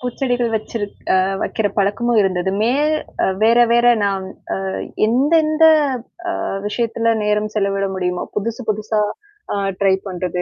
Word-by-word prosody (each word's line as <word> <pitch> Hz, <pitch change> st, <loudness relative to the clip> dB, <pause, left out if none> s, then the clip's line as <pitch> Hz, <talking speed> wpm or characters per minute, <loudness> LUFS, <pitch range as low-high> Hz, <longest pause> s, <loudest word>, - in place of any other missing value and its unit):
பூச்செடிகள் 245 Hz, -1 st, -1 dB
வெச்சிருக் 215 Hz, -1 st, -4 dB, 0.4 s
வெக்கிற 220 Hz, -, -1 dB
பழக்கமும் 215 Hz, +4 st, +1 dB
இருந்தது. 185 Hz, -1 st, 0 dB
மே 235 Hz, +3 st, +2 dB, 0.7 s
வேற 230 Hz, +2 st, +5 dB
வேற 240 Hz, 0 st, +4 dB, 0.2 s
நான் 195 Hz, -1 st, -1 dB, 0.4 s
அ -, -, -2 dB, 0.4 s
எந்தெந்த 310 Hz, +6 st, +3 dB, 0.8 s
அ -, -, -3 dB, 0.3 s
விஷயத்துல 230 Hz, +1 st, 0 dB
நேரம் 210 Hz, 0 st, 0 dB
செலவிட 195 Hz, -1 st, 0 dB
முடியுமோ, 180 Hz, -1 st, -2 dB
புதுசு 230 Hz, +4 st, -3 dB
புதுசா 215 Hz, 0 st, 0 dB, 0.5 s
ஆ -, -, -1 dB, 0.3 s
ட்ரை 195 Hz, -1 st, +4 dB
பண்றது, 180 Hz, -1 st, -3 dB
215 Hz, 120 wpm, -19 LUFS, 195-240 Hz, 0.8 s, வேற